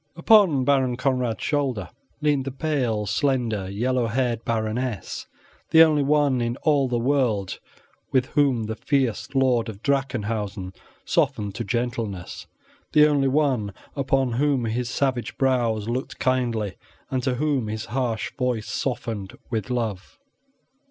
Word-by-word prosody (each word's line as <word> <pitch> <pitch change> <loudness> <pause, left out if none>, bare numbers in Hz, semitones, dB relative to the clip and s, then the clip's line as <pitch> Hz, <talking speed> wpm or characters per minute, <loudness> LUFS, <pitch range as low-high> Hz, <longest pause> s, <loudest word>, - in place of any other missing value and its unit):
Upon 170 - +5
Baron 130 -3 +2
Conrad's 125 -3 0
shoulder 130 - -1 0.3
leaned 145 -3 +1
the 135 - -3
pale, 130 -7 -1
slender, 110 -3 0
yellow 120 +4 0
haired 120 0 -1
Baroness, 110 -1 -2 0.4
the 160 0 +8
only 155 -2 +3
one 140 -3 +2
in 120 +1 -1
all 145 -4 +3
the 120 -1 0
world 120 -6 0 0.5
with 130 -2 +3
whom 135 -6 +2
the 110 +1 -3
fierce 130 -2 0
lord 125 -4 +2
of 105 0 -9
Drachenhausen 110 -8 -1 0.3
softened 105 -2 0
to 120 - -4
gentleness, 115 -5 -3 0.5
the 150 0 +7
only 145 -2 +3
one 130 -8 +1 0.2
upon 135 -2 +1
whom 135 0 +1
his 120 +2 -2
savage 130 -3 -1
brows 120 -5 +1
looked 125 +3 -3
kindly, 120 -6 0 0.3
and 130 -1 0
to 130 -1 0
whom 140 -4 0
his 110 +1 -4
harsh 120 -2 -2
voice 125 -4 -1
softened 115 -7 -3
with 115 +1 -2
love. 110 -6 -3
125 Hz, 135 wpm, -24 LUFS, 110-135 Hz, 0.5 s, the